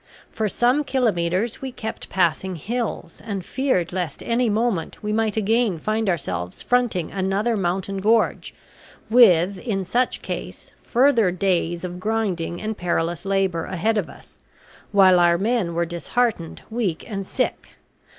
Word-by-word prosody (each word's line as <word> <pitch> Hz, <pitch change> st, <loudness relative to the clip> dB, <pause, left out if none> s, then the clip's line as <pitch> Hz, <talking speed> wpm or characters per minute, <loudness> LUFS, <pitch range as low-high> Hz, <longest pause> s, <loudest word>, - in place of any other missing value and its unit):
For 215 Hz, -1 st, -1 dB
some 250 Hz, +8 st, +2 dB
kilometres 220 Hz, -6 st, 0 dB
we 265 Hz, -1 st, -4 dB
kept 220 Hz, -2 st, -6 dB
passing 185 Hz, +1 st, 0 dB
hills, 230 Hz, +8 st, -4 dB
and 200 Hz, -5 st, -4 dB
feared 255 Hz, -11 st, 0 dB
lest 180 Hz, -6 st, -3 dB
at -, -, -11 dB
any 235 Hz, 0 st, +2 dB
moment 215 Hz, -6 st, -1 dB
we 210 Hz, 0 st, -1 dB
might 220 Hz, -1 st, 0 dB
again 220 Hz, -2 st, +2 dB
find 215 Hz, +4 st, -1 dB
ourselves 90 Hz, -, -3 dB
fronting 240 Hz, -9 st, +1 dB
another 195 Hz, +4 st, 0 dB
mountain 190 Hz, 0 st, -2 dB
gorge; 220 Hz, +3 st, +1 dB, 0.6 s
with, 195 Hz, -5 st, +5 dB
in 195 Hz, -5 st, -2 dB
such 240 Hz, +7 st, +1 dB
case, -, -, -6 dB
further 240 Hz, -5 st, +3 dB
days 175 Hz, -2 st, 0 dB
of 180 Hz, 0 st, -5 dB
grinding 185 Hz, -5 st, -2 dB
and 215 Hz, 0 st, -3 dB
perilous 175 Hz, -1 st, -2 dB
labor 195 Hz, -4 st, 0 dB
ahead 210 Hz, +4 st, 0 dB
of -, -, -4 dB
us, -, -, -16 dB, 0.5 s
while 190 Hz, -3 st, +6 dB
our 170 Hz, 0 st, +4 dB
men 200 Hz, -4 st, 0 dB
were 170 Hz, 0 st, +1 dB
disheartened, 175 Hz, +2 st, -2 dB
weak, 210 Hz, -8 st, -2 dB
and 195 Hz, -4 st, -5 dB
sick. -, -, -3 dB
195 Hz, 145 wpm, -23 LUFS, 175-225 Hz, 0.6 s, while